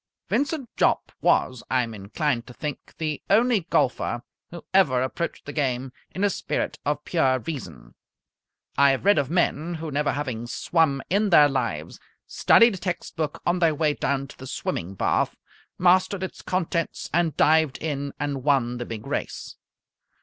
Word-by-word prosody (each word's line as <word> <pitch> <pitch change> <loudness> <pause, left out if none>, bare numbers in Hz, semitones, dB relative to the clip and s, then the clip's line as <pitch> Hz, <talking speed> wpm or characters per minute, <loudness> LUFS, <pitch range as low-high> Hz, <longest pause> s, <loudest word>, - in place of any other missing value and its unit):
Vincent 285 -2 0
Jopp, - - +2
was, 130 -2 +2
I 130 -1 +2
am 115 -1 -6
inclined 115 +5 -2
to 125 - -12
think, 150 -2 -6
the 155 -2 -3
only 220 -3 +3
golfer 120 -1 0 0.3
who 170 -1 -10
ever 150 -10 +4
approached 170 +6 -4
the 145 - -7
game 130 -3 -1 0.2
in 190 - -4
a 205 - +4
spirit - - -3
of 145 +1 -2
Pure 130 -7 +2
Reason. 85 - -7 0.9
I 140 0 +7
have 135 +5 0
read 205 -5 +5
of 140 -2 -1
men 170 -1 0
who, 160 -1 -5
never 145 +1 0
having 125 -5 -4
swum 140 +1 +1
in 205 +2 +2
their 150 -5 +7
lives, 115 - -3 0.3
studied 230 -1 +5
a - - -5
text 180 -2 -4
book 155 -3 -3
on 175 +1 +1
their 165 -3 +3
way 150 0 +1
down 140 -1 -1
to - - -13
the 130 - -8
swimming 95 -7 -4
bath, - - +1 0.4
mastered 185 +2 +3
its 190 - -6
contents, 175 -2 -2
and 170 -2 +1
dived 155 -3 +4
in 140 -3 -3
and 140 -2 -3
won 125 -4 +1
the 120 - -4
big 110 -2 -6
race. - - -4
145 Hz, 170 wpm, -25 LUFS, 130-175 Hz, 0.9 s, I